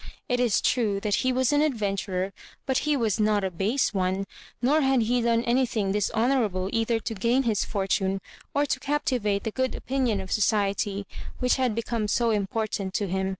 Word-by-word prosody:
It 245 -1 0
is 240 -5 +2
true 215 -6 +1
that 210 +1 +1
he 255 - +1
was 260 +2 +1
an 290 - +4
adventurer, 195 -8 -1 0.3
but 265 -1 +1
he 295 - +3
was 220 -5 0
not 210 -1 +2
a 190 - -1
base 215 +11 0
one; 190 0 0 0.3
nor 290 +5 +3
had 265 -3 +3
he 245 +2 +1
done 230 0 +2
anything 235 -5 +1
dishonourable 210 -2 +1
either 225 0 +1
to 225 - -3
gain 235 +6 +1
his 220 -5 +1
fortune 195 -1 0 0.3
or 285 +1 +1
to 265 -1 -1
captivate 260 -8 0
the 220 - -2
good 260 +2 -1
opinion 255 -6 -1
of 190 -1 -7
society, 200 -1 +1 0.3
which 250 0 +2
had 255 -4 +1
become 230 -1 -2
so 230 +2 +2
important 205 -2 -2
to 205 - 0
him. 190 +1 -1
225 Hz, 185 wpm, -26 LUFS, 200-250 Hz, 0.3 s, an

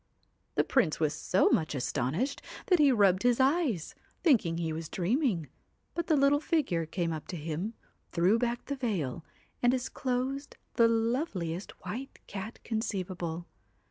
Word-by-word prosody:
The - - +4
Prince 210 - +2
was 155 -1 +2
so 180 +5 +2
much 155 -2 +1
astonished 140 - -1 0.2
that 360 -3 +4
he 290 -2 +6
rubbed 195 -5 +4
his 245 0 +3
eyes, 265 - +2 0.3
thinking 210 - +4
he 165 -2 -1
was 160 0 -5
dreaming, 195 - 0 0.5
but 340 -1 -2
the 315 - +4
little 280 +1 +4
figure 285 - 0
came 170 0 -1
up 155 - -6
to - - -5
him, 165 +8 -3 0.4
threw 185 +6 +3
back 240 0 -1
the 280 - -2
veil, 180 - -2 0.4
and 245 - +5
disclosed 260 +2 -2 0.2
the 230 -1 +5
loveliest 225 - -1
white 265 +5 -5
cat 205 +3 -6
conceivable. 185 -7 -3
220 Hz, 145 wpm, -30 LUFS, 170-260 Hz, 0.5 s, he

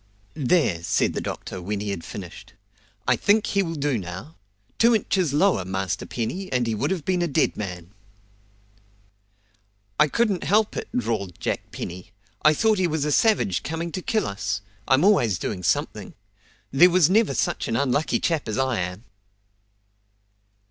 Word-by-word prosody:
"There!" 145 - +1
said 85 - +1
the - - -3
doctor 95 - -6
when 100 +3 -3
he 105 0 -3
had 85 -4 -5
finished. 95 -4 -9 0.5
"I - - +4
think 210 +1 +3
he 200 - +1
will 165 -3 -3
do 140 -5 0
now. 95 - -8 0.4
Two 230 0 +5
inches 190 -6 +1
lower, 155 - +2
Master 95 -1 -3
Penny, 180 +12 -4
and 125 -2 +1
he 115 - -1
would 120 +7 -1
have 180 -5 -2
been 185 -1 +1
a 175 - +1
dead 140 - +1
man." 90 -3 -6 2.1
"I 150 - +6
couldn't 205 - 0
help 210 +3 +2
it!" - - -5
drawled 105 -7 -2
Jack - - -3
Penny. 90 +1 -7 0.3
"I 155 0 +5
thought 220 +3 +2
he 185 - +2
was 155 -2 -1
a 150 - 0
savage 205 - +2
coming 165 +2 -4
to 185 - -4
kill 220 +1 0
us. 100 0 -3 0.3
I'm 135 +4 +4
always 125 - +4
doing 95 0 -4
something. 90 - -1 0.6
There 165 +7 +7
never 185 +5 +4
was 135 - -3
such - - -1
an 115 - -1
unlucky 140 +4 +1
chap 160 -7 -1
as 110 - -2
I 130 -4 +1
am!" 90 +4 -4
140 Hz, 170 wpm, -24 LUFS, -, 2.1 s, There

